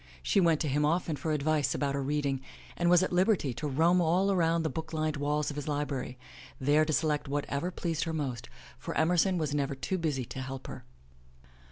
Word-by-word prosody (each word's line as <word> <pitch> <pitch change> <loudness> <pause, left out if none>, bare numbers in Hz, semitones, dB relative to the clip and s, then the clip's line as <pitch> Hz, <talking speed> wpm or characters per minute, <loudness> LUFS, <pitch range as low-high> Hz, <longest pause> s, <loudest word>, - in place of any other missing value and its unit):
She 195 - +2
went 165 -3 +3
to 155 - 0
him 145 +2 +1
often 165 +1 +1
for 150 +3 -3
advice 150 -1 +1
about 140 -1 -1
her 140 - -1
reading 140 -1 -1 0.3
and 175 0 +1
was 180 +1 +6
at 185 - -2
liberty 180 - +2
to 150 +6 -4
roam 165 +6 +3
all 180 +4 +2
around 165 -3 +2
the 160 - 0
book 160 +3 -6
lined 155 -1 0
walls 150 +1 -1
of - - -8
his 145 - -4
library, 140 -4 -3 0.4
there 145 +3 +3
to 155 - -1
select 150 0 0
what 145 +1 -1
ever 140 +6 -2
pleased 165 -3 -2
her 165 - -3
most, 135 -7 -3 0.3
for - - -5
Emerson 175 +3 +3
was 155 -3 -1
never 140 -1 -1
too 185 +7 -2
busy 145 -6 -1
to 130 - -6
help 130 0 -6
her. - - -8
150 Hz, 215 wpm, -30 LUFS, 140-165 Hz, 0.4 s, was